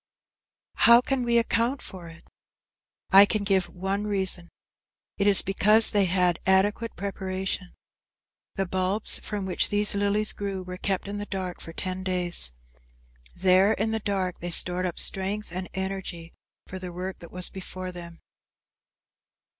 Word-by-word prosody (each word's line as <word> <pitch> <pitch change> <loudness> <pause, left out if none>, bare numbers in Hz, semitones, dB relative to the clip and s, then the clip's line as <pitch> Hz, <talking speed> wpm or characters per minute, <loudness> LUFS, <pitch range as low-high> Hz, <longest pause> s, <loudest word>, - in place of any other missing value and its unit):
I - - 0
How 235 +1 +8
can 270 0 -1
we 235 -1 +2
account 235 +3 +1
for 180 -3 -8
it? 165 +1 -14 0.9
I 195 +1 +8
can 215 -1 -1
give 190 -3 +1
one 195 +4 -3
reason. 190 -4 -1 0.7
It 200 - +2
is 200 -2 +9
because 210 +3 +5
they 205 -2 +2
had 180 -1 +1
adequate 205 +4 +1
preparation. 190 -1 -4 0.8
The 195 - -1
bulbs 190 +3 +1
from 205 -2 -5
which 185 - 0
these 205 0 +2
lilies 205 +1 0
grew 195 -2 -5
were 180 0 -8
kept 195 0 -2
in 205 +1 -5
the 205 - -6
dark 185 -2 -5
for 165 - -8
ten 185 +2 -4
days. 180 - +1 0.8
There, 190 +3 +4
in 220 +1 -1
the 220 - -1
dark, 190 -3 -3
they 175 - -5
stored 180 +1 +1
up 175 - -6
strength 195 +1 -1
and 185 +1 -5
energy 190 -3 -5 0.3
for 185 - -8
the 180 -1 -7
work 185 +2 -6
that 170 - -12
was 180 0 -2
before 185 -1 -7
them. 170 -1 -11
190 Hz, 155 wpm, -26 LUFS, 180-205 Hz, 0.9 s, is